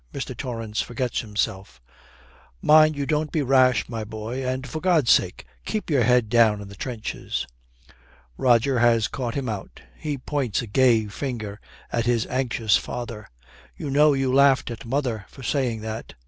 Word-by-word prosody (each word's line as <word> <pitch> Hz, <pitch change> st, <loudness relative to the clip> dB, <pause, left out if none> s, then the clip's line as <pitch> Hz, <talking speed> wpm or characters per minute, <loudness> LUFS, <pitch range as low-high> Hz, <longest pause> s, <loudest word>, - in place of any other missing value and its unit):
Mr. -, -, -4 dB
Torrance 115 Hz, -3 st, -3 dB
forgets 120 Hz, 0 st, -2 dB
himself. 105 Hz, -, -3 dB, 0.8 s
'Mind 155 Hz, 0 st, +5 dB
you 140 Hz, -1 st, -2 dB
don't 150 Hz, +1 st, -1 dB
be 155 Hz, -, 0 dB
rash, 130 Hz, -1 st, +3 dB
my 115 Hz, -2 st, -4 dB
boy; 110 Hz, +4 st, -5 dB
and 130 Hz, +1 st, -2 dB
for 155 Hz, +5 st, -5 dB
God's 170 Hz, -9 st, +3 dB
sake, -, -, +2 dB, 0.2 s
keep 215 Hz, -6 st, -3 dB
your 140 Hz, -4 st, +3 dB
head 125 Hz, -1 st, +3 dB
down 110 Hz, -2 st, +4 dB
in 100 Hz, -1 st, -9 dB
the 100 Hz, -, -11 dB
trenches.' 115 Hz, -, -4 dB, 0.9 s
Roger 125 Hz, -, +3 dB
has 115 Hz, -2 st, +3 dB
caught 120 Hz, -4 st, -4 dB
him 135 Hz, -2 st, -2 dB
out. 105 Hz, -4 st, -6 dB
He 150 Hz, -2 st, -4 dB
points 130 Hz, -4 st, -2 dB
a -, -, -5 dB
gay 115 Hz, 0 st, +3 dB
finger 105 Hz, -1 st, -5 dB, 0.3 s
at 120 Hz, 0 st, -1 dB
his 120 Hz, -2 st, +2 dB
anxious 120 Hz, -5 st, +1 dB
father. 115 Hz, -3 st, -6 dB, 0.5 s
'You 145 Hz, -, -5 dB
know 150 Hz, +1 st, +5 dB
you 135 Hz, -1 st, 0 dB
laughed 135 Hz, -2 st, +4 dB
at 115 Hz, -, -8 dB
mother 120 Hz, -5 st, -2 dB
for 135 Hz, -, -13 dB
saying 120 Hz, -3 st, -1 dB
that!' 110 Hz, 0 st, -6 dB
120 Hz, 165 wpm, -24 LUFS, 110-135 Hz, 0.9 s, Mind